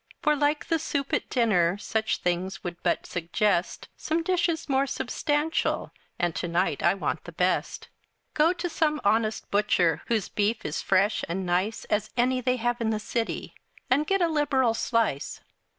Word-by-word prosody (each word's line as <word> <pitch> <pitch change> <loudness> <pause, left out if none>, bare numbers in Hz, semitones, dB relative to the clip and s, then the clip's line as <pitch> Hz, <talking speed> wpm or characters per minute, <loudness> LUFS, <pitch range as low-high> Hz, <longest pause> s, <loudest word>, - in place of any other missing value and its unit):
For, 300 -1 +4
like 295 +1 +1
the 330 - +1
soup 285 -3 -3
at - - 0
dinner, 200 -8 +2
Such 220 +1 -1
things 180 +2 -2
would 175 -1 -6
but 175 - 0
suggest 175 +2 -1
Some 325 +1 -1
dishes 345 -2 0
more 275 -1 +2
substantial, 295 +3 -1 0.3
And 175 -1 0
to 175 - -2
night 175 +3 0
I - - +3
want 195 - -2
the - - -8
best. - - -1 0.5
Go 310 +2 +4
to 355 0 -3
some 310 -3 0
honest 215 +1 +1
butcher, 180 -6 +2
Whose 220 -5 0
beef 210 +2 -1
is 150 - -2
fresh 200 +3 +2
and 185 +2 -2
nice, 185 +5 0
As 210 0 -1
any 255 +1 +2
they 250 0 +1
have 240 0 -1
in 225 - +1
the 215 -1 0
city, 225 +2 -3 0.4
And 290 +4 +3
get 390 -2 +2
a - - +4
liberal 285 -6 +2
slice. 225 - -1
230 Hz, 170 wpm, -27 LUFS, 190-295 Hz, 0.5 s, For